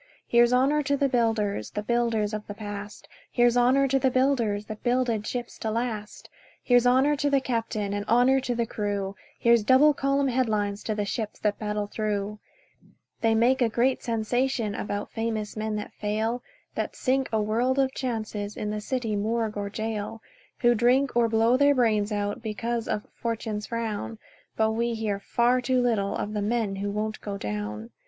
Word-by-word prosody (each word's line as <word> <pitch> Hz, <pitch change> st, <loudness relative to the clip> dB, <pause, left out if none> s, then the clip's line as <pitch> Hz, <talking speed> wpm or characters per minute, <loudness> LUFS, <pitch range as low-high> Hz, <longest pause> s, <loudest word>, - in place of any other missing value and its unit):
Here's 240 Hz, 0 st, +5 dB
honour 270 Hz, +4 st, +3 dB
to 280 Hz, 0 st, 0 dB
the 280 Hz, -, +2 dB
builders 225 Hz, -, 0 dB
– -, -, -40 dB
The 210 Hz, -, -2 dB
builders 225 Hz, -2 st, 0 dB
of 215 Hz, 0 st, -5 dB
the 205 Hz, -, -6 dB
past; 205 Hz, -1 st, -7 dB, 0.2 s
Here's 240 Hz, -1 st, +3 dB
honour 255 Hz, +3 st, +4 dB
to 270 Hz, +1 st, +2 dB
the 265 Hz, -, +3 dB
builders 245 Hz, -6 st, +1 dB
That 215 Hz, 0 st, -8 dB
builded 240 Hz, -3 st, 0 dB
ships 245 Hz, -1 st, -5 dB
to 220 Hz, -, -2 dB
last; 220 Hz, -2 st, -4 dB, 0.4 s
Here's 245 Hz, -1 st, +4 dB
honour 265 Hz, +4 st, +4 dB
to 285 Hz, +1 st, +1 dB
the 280 Hz, -1 st, +3 dB
captain, 225 Hz, -5 st, -2 dB
And 205 Hz, 0 st, -2 dB
honour 250 Hz, +4 st, +4 dB
to 255 Hz, -2 st, -2 dB
the 235 Hz, 0 st, 0 dB
crew; 205 Hz, -3 st, -3 dB, 0.2 s
Here's 235 Hz, -2 st, +4 dB
double 265 Hz, +6 st, +6 dB
column 275 Hz, 0 st, +1 dB
headlines 215 Hz, -5 st, 0 dB
To 215 Hz, -, -1 dB
the 205 Hz, -1 st, -1 dB
ships 215 Hz, +1 st, -3 dB
that 210 Hz, -1 st, 0 dB
battle 210 Hz, -1 st, -2 dB
through. 210 Hz, 0 st, -3 dB, 0.8 s
They 225 Hz, -1 st, +3 dB
make 250 Hz, +4 st, +3 dB
a 235 Hz, -, +4 dB
great 250 Hz, +4 st, +1 dB
sensation 230 Hz, 0 st, 0 dB
About 205 Hz, 0 st, -4 dB
famous 225 Hz, -2 st, -3 dB
men 215 Hz, 0 st, -2 dB
that 210 Hz, -, -5 dB
fail, 220 Hz, +3 st, -2 dB, 0.3 s
That -, -, -3 dB
sink 265 Hz, 0 st, 0 dB
a 220 Hz, -, +1 dB
world 235 Hz, +5 st, +1 dB
of 265 Hz, -1 st, +2 dB
chances 215 Hz, -4 st, -4 dB
In 210 Hz, -, -2 dB
the 210 Hz, 0 st, -3 dB
city 230 Hz, -2 st, -2 dB
morgue 220 Hz, +1 st, -1 dB
or 205 Hz, -1 st, -3 dB
gaol, 220 Hz, +1 st, -4 dB, 0.4 s
Who 240 Hz, 0 st, +5 dB
drink, 250 Hz, +4 st, +2 dB
or 235 Hz, -1 st, +3 dB
blow 225 Hz, +2 st, +3 dB
their 285 Hz, +1 st, +4 dB
brains 215 Hz, -4 st, +2 dB
out, 205 Hz, 0 st, -2 dB
Because 230 Hz, +1 st, -3 dB
of 210 Hz, -, -2 dB
"Fortune's 220 Hz, -2 st, -3 dB
frown". 230 Hz, -1 st, -3 dB, 0.4 s
But 220 Hz, 0 st, +3 dB
we 235 Hz, +1 st, -1 dB
hear 215 Hz, -3 st, -2 dB
far 240 Hz, +4 st, +2 dB
too 255 Hz, 0 st, +1 dB
little 225 Hz, -5 st, +1 dB
Of 210 Hz, -, -3 dB
the 210 Hz, -, -1 dB
men 210 Hz, -2 st, -1 dB
who 200 Hz, +1 st, -2 dB
won't 215 Hz, +1 st, -3 dB
go 200 Hz, -1 st, -4 dB
down. 105 Hz, -, -5 dB
225 Hz, 185 wpm, -26 LUFS, 210-245 Hz, 0.8 s, double